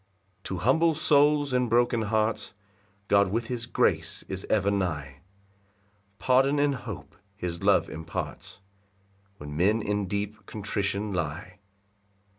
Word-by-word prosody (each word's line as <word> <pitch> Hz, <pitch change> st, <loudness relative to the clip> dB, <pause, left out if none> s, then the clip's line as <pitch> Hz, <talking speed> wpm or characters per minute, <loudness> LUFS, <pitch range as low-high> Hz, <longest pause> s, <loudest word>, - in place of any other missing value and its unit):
4 -, -, -38 dB
To 95 Hz, -, -3 dB
humble 160 Hz, +6 st, +3 dB
souls 145 Hz, -2 st, +3 dB
and 125 Hz, -1 st, +2 dB
broken 120 Hz, 0 st, +3 dB
hearts 110 Hz, 0 st, -1 dB, 0.5 s
God 100 Hz, -1 st, +4 dB
with 115 Hz, +2 st, -2 dB
his 120 Hz, -2 st, -3 dB
grace -, -, 0 dB
is 95 Hz, 0 st, -5 dB
ever 100 Hz, -2 st, +2 dB
nigh; 75 Hz, -9 st, -2 dB, 1.0 s
Pardon 135 Hz, +5 st, +3 dB
and 145 Hz, 0 st, +3 dB
hope 130 Hz, -, -8 dB, 0.2 s
his 85 Hz, -3 st, -4 dB
love -, -, +3 dB
imparts 90 Hz, +3 st, -6 dB, 0.8 s
When 75 Hz, 0 st, -8 dB
men 105 Hz, +7 st, +2 dB
in 105 Hz, -1 st, -1 dB
deep 100 Hz, +1 st, -4 dB
contrition 100 Hz, 0 st, -2 dB
lie. 90 Hz, +3 st, -4 dB
105 Hz, 125 wpm, -27 LUFS, 95-125 Hz, 1.0 s, God